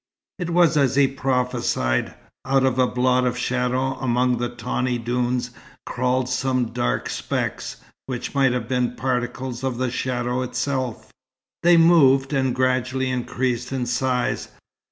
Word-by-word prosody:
It 175 -2 -3
was 170 -3 +4
as 135 -3 +3
he 140 -1 +5
prophesied. 125 - -1 0.3
Out 135 0 +2
of 130 -1 +1
a 130 - +4
blot 125 0 +2
of 125 0 -2
shadow 130 +1 -1
among 125 -1 +1
the 120 0 -1
tawny 120 +1 -2
dunes 120 +1 -1 0.3
crawled 125 0 0
some 130 -1 -1
dark - - -1
specks, - - -3 0.3
which 125 -2 -4
might 135 -2 +3
have 125 -3 -2
been 125 -1 0
particles 125 0 -3
of 130 -3 -1
the 130 -1 -1
shadow 125 0 -2
itself. 130 -1 -3 0.5
They 175 0 +6
moved, 145 -5 +5
and 130 -2 +1
gradually 130 0 0
increased 125 0 -2
in 130 -2 -1
size. 125 0 -1
125 Hz, 140 wpm, -23 LUFS, 125-130 Hz, 0.5 s, They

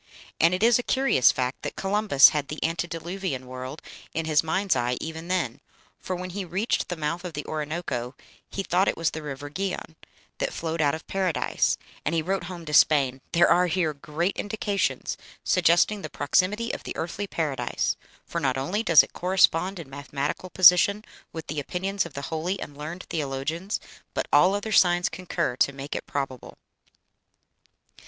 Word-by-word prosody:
And 170 +3 +4
it 185 - -2
is 235 +1 +5
a - - +1
curious 260 - +4
fact 130 -1 -2
that - - -5
Columbus 195 -7 +5
had 145 -2 -2
the 150 - -6
antediluvian 165 -2 -3
world 130 +3 -7 0.3
in 165 0 -1
his 155 -2 +3
mind's 190 +5 +1
eye 120 +1 0
even 160 +1 -6
then, 180 -10 -1 0.4
for 185 - -4
when 180 +1 -5
he 195 +2 -4
reached 185 +6 -1
the 175 - -2
mouth 165 +2 -3
of 180 -3 -6
the 145 0 -5
Orinoco 150 -5 -3 0.3
he 195 - -3
thought 185 +1 +2
it - - 0
was 165 -1 +1
the 160 - -6
river 145 -1 -6
Gihon, 180 0 -4 0.4
that - - -1
flowed 165 0 -2
out 145 0 +2
of 160 - -10
Paradise, 190 -4 0 0.3
and 160 - -1
he 160 - +1
wrote 190 +1 -1
home 175 -2 -8
to 150 - -6
Spain, 135 -4 +4
"There 170 +1 +5
are 180 +1 +4
here 165 -2 0
great 150 +6 -2
indications 205 -1 -1 0.3
suggesting 180 +4 +3
the - - -6
proximity 195 +10 +1
of - - -5
the - - -6
earthly 195 +5 -4
Paradise, 155 -7 -1 0.3
for 170 - -3
not 135 -2 +1
only 175 +11 -1
does 170 -8 +7
it - - -11
correspond 185 0 +2
in 165 - -8
mathematical 145 +5 -4
position 185 +4 +6 0.3
with 160 -1 -7
the 150 0 -3
opinions 190 +5 -2
of 160 - -17
the 140 - -5
holy 175 +5 -2
and 145 - -7
learned 155 +5 -6
theologians, 155 +6 -2 0.4
but - - -1
all 185 +2 +6
other 205 +2 -3
signs 175 -3 +4
concur 180 -8 -2
to 140 - +3
make 140 +1 -6
it - - -5
probable." 135 -3 -4
165 Hz, 180 wpm, -26 LUFS, 145-185 Hz, 0.4 s, does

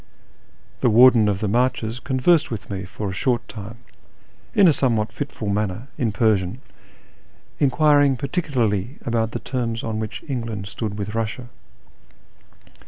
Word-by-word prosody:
The 125 - +3
Warden 115 -1 +6
of 100 -2 -2
the 105 - 0
IMarches 120 +1 0
conversed 130 +6 +2
with 110 -3 -6
me 95 -2 -4
for 100 +3 -6
a 95 - -3
short 120 +3 0
time, 110 +1 -9 0.8
in 195 - +7
a - - +7
somewliat 115 -6 0
fitful 140 -7 -4
manner, 105 +4 -2
in 115 -4 0
Persian, 105 0 +1 1.0
enquiring 145 0 +4
par 140 - -3
ticularly 125 - -1
about 115 -2 0
the - - -4
terms 120 -3 -3
on 110 -1 -3
which 110 -1 -5
England 115 -7 -4
stood 105 +1 -5
with 100 -1 -4
Kussia. 115 +2 -3
115 Hz, 145 wpm, -22 LUFS, 105-130 Hz, 1.0 s, in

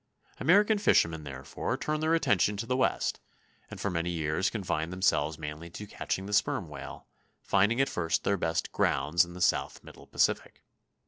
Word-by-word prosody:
American 205 +6 +4
fishermen 80 - +2
therefore 65 -1 -4
turned 155 0 -2
their 160 +1 +3
attention 105 - +2
to 110 - -3
the 125 +2 -1
West, 130 - 0 0.5
and - - -9
for - - -1
many 85 0 -1
years 80 +1 0
confined 85 -6 -2
themselves 80 -5 +1
mainly 75 +2 -7
to 105 +5 -8
catching 95 -1 -4
the 105 - -6
sperm 95 -3 +1
whale, 70 -2 -9 0.4
finding 105 +5 +2
at 135 - +3
first 85 -2 -1
their 100 - +2
best 80 -3 -1
"grounds" 75 +6 +2
in 85 0 -9
the 90 - -9
south - - +1
middle - - -14
Pacific. - - 0
90 Hz, 175 wpm, -29 LUFS, 80-105 Hz, 0.5 s, American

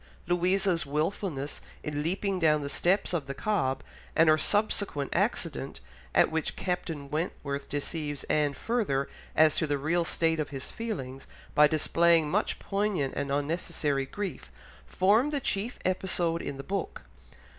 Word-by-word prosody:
Louisa's 180 +1 +2
wilfulness 150 0 -2 0.2
in 150 -1 -2
leaping 190 +4 -1
down 155 -3 +4
the 140 - -4
steps 190 +2 +2
of 155 -6 -1
the 140 - -4
Cobb, 135 -9 0 0.3
and 165 0 +6
her 155 - +6
subsequent 205 -9 +2
accident, 170 - -1 0.4
at - - +5
which 160 -1 -1
Captain 165 -5 -3
Wentworth 145 -3 -3
deceives 145 0 -3
Anne 150 -2 +1
further 195 - 0 0.3
as 155 -1 +5
to 160 - +1
the 145 -1 +1
real 165 +5 +1
state 165 -1 +1
of 150 - -1
his 135 -2 -6
feelings 135 - -5 0.3
by 150 0 +7
displaying 160 +1 +3
much 210 +3 +1
poignant 195 -9 -1
and 140 - -2
unnecessary 145 -1 -1
grief, 195 - -5 0.4
form 215 +9 +3
the 295 -1 -1
chief 230 -1 -2
episode 180 -3 +1
in 135 - -5
the 135 - -6
book. 195 +2 -4
160 Hz, 145 wpm, -29 LUFS, 145-190 Hz, 0.4 s, by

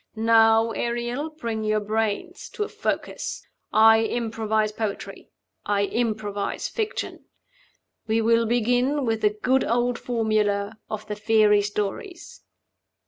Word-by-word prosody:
Now, 225 0 +4
Ariel, 240 +6 -2
bring 235 -8 -4
your 215 0 +1
brains 215 0 -2
to 420 - -2
a - - -4
focus. - - -4 0.3
I 220 +1 +6
improvise 220 -2 -1
poetry; 215 -2 -5 0.3
I 205 -1 +1
improvise 210 -3 -2
fiction. 440 -1 -4 0.8
We 220 +1 +2
will 230 0 +3
begin 245 +4 +1
with 225 -1 -1
the 210 - +4
good 255 +5 +1
old 240 +1 0
formula 215 -3 0
of 215 0 -5
the 210 - -3
fairy 210 -1 +4
stories. 210 - -5
225 Hz, 120 wpm, -24 LUFS, 215-240 Hz, 0.8 s, I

